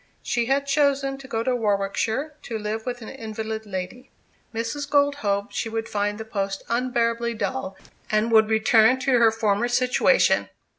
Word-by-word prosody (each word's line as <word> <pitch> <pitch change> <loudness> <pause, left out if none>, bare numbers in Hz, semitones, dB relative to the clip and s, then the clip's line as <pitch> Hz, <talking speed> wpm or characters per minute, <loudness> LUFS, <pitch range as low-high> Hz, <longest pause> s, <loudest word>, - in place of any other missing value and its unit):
She 235 -2 0
had 275 +1 +1
chosen 280 -1 +1
to 270 - -11
go 225 -4 -2
to 255 +1 +1
Warwickshire, 220 +6 -1
to 225 - -5
live 215 +2 -4
with 245 -1 -4
an - - -8
invalid 220 0 -6
lady. 190 +7 -6 0.4
Mrs. 235 +6 -4
Gold 285 -1 +3
hoped 200 -4 -1
she 225 - -2
would 225 0 -3
find 205 0 -1
the 220 - -6
post 195 -3 -3
unbearably 235 -1 0
dull, 215 -4 -3 0.3
and 215 +2 +1
return 220 +2 +5
to 270 +1 +1
her 230 -1 +6
former 220 0 0
situation. 255 - +3
230 Hz, 160 wpm, -24 LUFS, 215-255 Hz, 0.4 s, her